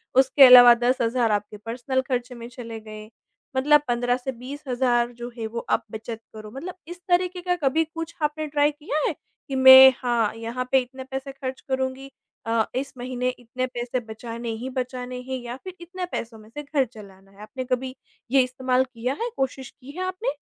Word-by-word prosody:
उसके 265 +2 +6
अलावा 245 -1 +10
10 250 +2 +2
हज़ार 230 -1 +1
आपके 210 0 -2
पर्सनल 240 +5 -2
ख़र्चे 250 0 -2
में 235 0 -8
चले 230 -2 -8
गए 215 0 -10 0.5
मतलब 295 +3 +5
15 245 0 +1
से 255 +1 -4
20 260 +4 -9
हज़ार 245 -1 +1
जो 240 0 -7
है 225 - -4
वो 230 +1 -5
आप 235 - +2
बचत 225 +1 -6
करो 215 -1 -10
मतलब 340 +9 -7
इस 350 +1 -9
तरीक़े 360 0 +1
का 360 0 0
कभी 315 -1 +1
कुछ 330 +1 -7
आपने 305 +1 -1
ट्राई 290 0 +2
किया 295 +1 -3
है - - -1 0.3
कि 275 - -4
मैं 260 0 +10
हाँ, 235 -4 0
यहाँ 230 +3 -4
पे 265 - +6
इतने 260 +1 -9
पैसे 265 +1 -6
ख़र्च 265 -1 -6
करूँगी 265 0 -3 0.3
अ, 225 -1 +1
इस 270 +2 -3
महीने 250 0 -2
इतने 250 0 -4
पैसे 245 0 -3
बचाने 230 +1 -6
ही 260 - -4
बचाने 255 -1 -4
हैं 260 +1 -4
या 240 0 -6
फ़िर 370 +6 -9
इतने 360 +2 -5
पैसों 225 -1 -5
में 215 0 -16
से 295 +6 -7
घर 280 -2 +1
चलाना 195 -4 -15
है? 200 +1 -17
आपने 240 +5 -6
कभी 255 +1 -2 0.4
ये 270 0 +6
इस्तेमाल 255 0 0
किया 245 +3 -2
है 475 - -1
कोशिश 265 -1 -2
की 270 +1 -14
है 370 - -2
आपने? 370 +6 -2
255 Hz, 200 wpm, -24 LUFS, 235-270 Hz, 0.5 s, अलावा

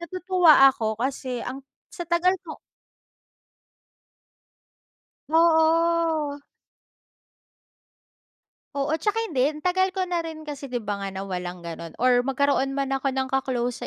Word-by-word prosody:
natutuwa 360 -5 +5
ako 220 -4 -2
kasi 255 -1 -3
ang 265 +1 -7 0.2
sa 345 - -7
tagal 345 +3 +2
ko. 315 - -8 2.8
Oo. 325 -2 +3 2.4
Oo, 280 +1 -1
tsaka 415 +6 -1 0.2
hindi 280 +1 +1
tagal 375 +2 +1
ko 380 - -1
na 360 -1 -1
rin 320 -2 -6
kasi, 290 -2 -7
di' 245 -3 -4
ba, 205 -1 -3
nga 200 - -4
na 190 - -4
walang 180 -2 -5
gano'n 165 -1 -8
or 245 0 +2
magkaroon 270 0 +1
man 275 -1 -2
ako 270 0 -1
ng 265 0 -2
ka-close 250 -2 -2
275 Hz, 120 wpm, -24 LUFS, 250-330 Hz, 2.8 s, natutuwa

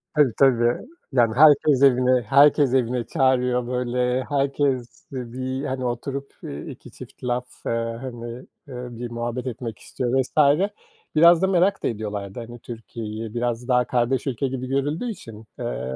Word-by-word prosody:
Tabii, 145 -6 +4
tabii. 120 - +3 0.3
Yani, 120 -3 +3
herkes 145 -1 +6
evine 125 -1 +4
herkes 140 +3 +4
evine 125 -1 +1
çağırıyor. 125 -4 +1
Böyle, 125 0 0
herkes 135 -3 -1
bir, 130 +1 -4
hani, 130 -1 -3
oturup 135 +3 -4 0.4
2 - - -11
çift - - -13
laf, 125 0 -1 0.6
hani, 120 -1 -7 0.2
bir 125 -2 -7
muhabbet 120 +2 -4
etmek 115 -2 -5
istiyor 130 +1 -1
vs. 145 +2 +3 0.6
Biraz 170 +2 +7
da 190 - +3
merak 190 +1 +2
da - - +1
ediyorlardı, 105 -1 -4
hani, 120 0 -9
Türkiye'yi. 110 -2 -7
Biraz 120 0 -2
daha 125 -1 +3
kardeş 125 +3 0
ülke 135 +1 -1
gibi 130 -1 -4
görüldüğü 145 - -1
için. 115 - -11
Eee, 65 +2 -4
125 Hz, 140 wpm, -23 LUFS, 120-135 Hz, 0.6 s, Biraz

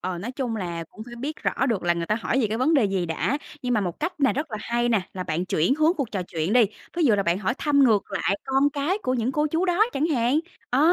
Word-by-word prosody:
Ờ, 180 -1 -3
nói 230 +8 -5
chung 250 -4 -3
là 170 -4 -4
cũng 215 - -10
phải 240 0 -10
biết 285 +6 -4
rõ 260 - 0
được 225 -7 0
là 175 0 +2
người 170 0 -3
ta 210 - +1
hỏi 230 +4 -1
về 230 - +2
cái 215 +2 -3
vấn 310 +6 +3
đề 270 -7 +4
gì 195 -3 0
đã, 230 - -1 0.2
nhưng 250 -1 0
mà 215 - +2
một 180 -4 -4
cách 335 +1 -3
này 270 - +4
rất 295 +3 -3
là 215 - -3
hay 240 +2 0
nè, 225 -4 +3
là 185 - -3
bạn 175 0 -2
chuyển 175 +6 +2
hướng 310 +2 +3
cuộc 275 -6 -2
trò 195 -3 -2
chuyện 170 +1 -2
đi. 245 -1 +6 0.3
Ví 345 - +2
dụ 235 -7 +5
là 200 - +1
bạn 175 -1 +1
hỏi 200 +4 -1
thăm 285 -2 +4
ngược 215 -4 +2
lại 195 0 0
con 270 +1 +2
cái 295 +7 -1
của 255 - 0
những 245 +1 0
cô 300 +2 +1
chú 325 +4 0
đó 370 +3 +3
chẳng 295 - +1
hạn. 265 -1 +2 0.3
Ờ, 295 +7 +5
240 Hz, 295 wpm, -25 LUFS, 195-285 Hz, 0.3 s, đi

